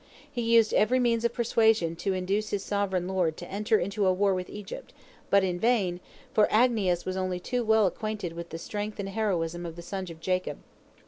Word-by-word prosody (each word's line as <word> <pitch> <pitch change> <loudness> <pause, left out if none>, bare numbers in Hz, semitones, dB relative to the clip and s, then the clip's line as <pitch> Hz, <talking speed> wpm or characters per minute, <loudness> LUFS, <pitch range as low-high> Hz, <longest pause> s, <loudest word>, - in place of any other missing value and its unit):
He 240 - -3
used 230 -1 +4
every 255 +4 +3
means 235 -2 +2
of 235 - +1
persuasion 220 -7 +2
to 195 +3 -1
induce 195 +4 -1
his 200 -1 -2
sovereign 190 -3 -1
lord 180 -4 0
to 175 - -8
enter 210 +3 +1
into 200 +1 0
a - - +5
war 195 +1 +2
with 185 -1 -3
Egypt, 205 -2 -8 0.4
but 200 -1 +5
in 180 -2 -1
vain, 200 -7 +1 0.3
for 215 -5 +5
Agnias 215 -7 +2
was 185 - -2
only 185 -1 -1
too 245 +6 -2
well 220 -1 +4
acquainted 205 -2 -3
with 170 0 -7
the 165 - -6
strength 205 +5 -5
and 195 -1 -3
heroism 175 -5 -1
of 165 -1 -6
the 170 - -9
sons 190 0 -5
of 165 -1 -10
Jacob. 180 -4 -1
195 Hz, 205 wpm, -28 LUFS, 180-220 Hz, 0.4 s, a